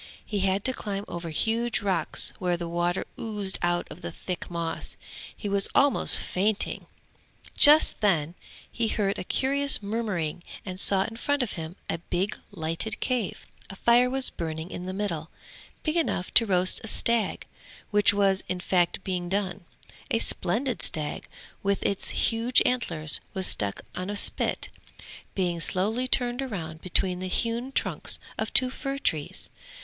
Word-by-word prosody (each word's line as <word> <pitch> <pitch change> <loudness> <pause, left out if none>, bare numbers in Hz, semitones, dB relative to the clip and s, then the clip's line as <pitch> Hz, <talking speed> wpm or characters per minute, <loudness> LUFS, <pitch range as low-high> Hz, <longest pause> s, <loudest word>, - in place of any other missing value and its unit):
He 210 - -2
had 195 +1 +1
to 260 - +2
climb 205 -4 -4
over 170 -1 -5
huge 230 +8 0
rocks 185 -5 +3
where 180 -2 0
the 170 0 -4
water 175 +1 -1
oozed 210 -4 -3
out 175 0 0
of - - -10
the 85 - -5
thick 180 - -5
moss. 170 -1 -3 0.4
He 210 - -5
was 200 -1 +2
almost 280 0 +5
fainting; 205 +3 -1 0.7
just 300 +1 +7
then 170 -6 +2 0.4
he 230 -1 0
heard 200 -2 0
a - - -3
curious 275 +3 +2
murmuring 200 -7 -2 0.2
and 185 -1 -5
saw 195 -1 +4
in 225 +3 -7
front 285 +2 +1
of 235 - -3
him 165 +1 -6
a 165 - -2
big 180 +4 -2
lighted 165 +2 -2
cave. 245 -7 -2 0.2
A 195 - -7
fire 240 +4 +4
was 265 0 +6
burning 160 +1 -5
in 180 - -6
the 185 - -3
middle, 170 -6 -3 0.5
big 310 +1 0
enough 235 - -1
to 230 - +6
roast 185 -1 +3
a - - -5
stag, 230 -1 +1 0.5
which 205 -1 +6
was 200 -1 +2
in 180 - -2
fact 180 -1 +1
being 180 -2 -2
done; 195 -1 -2 0.4
a - - +2
splendid 245 +2 -1
stag 150 -2 -1 0.3
with 200 0 0
its 200 - +1
huge 235 +2 +2
antlers 165 -11 +1 0.2
was 190 -1 0
stuck 100 - 0
on 185 +2 -4
a 205 - 0
spit, - - 0 0.7
being 175 -3 0
slowly 220 +9 +1
turned 245 0 +1
round 160 -6 -6
between 185 0 0
the 185 - -3
hewn 235 +6 -1
trunks - - -1 0.2
of - - -1
two 255 -1 +3
fir 275 +1 -4
trees. 155 - -2
195 Hz, 160 wpm, -27 LUFS, 175-230 Hz, 0.7 s, just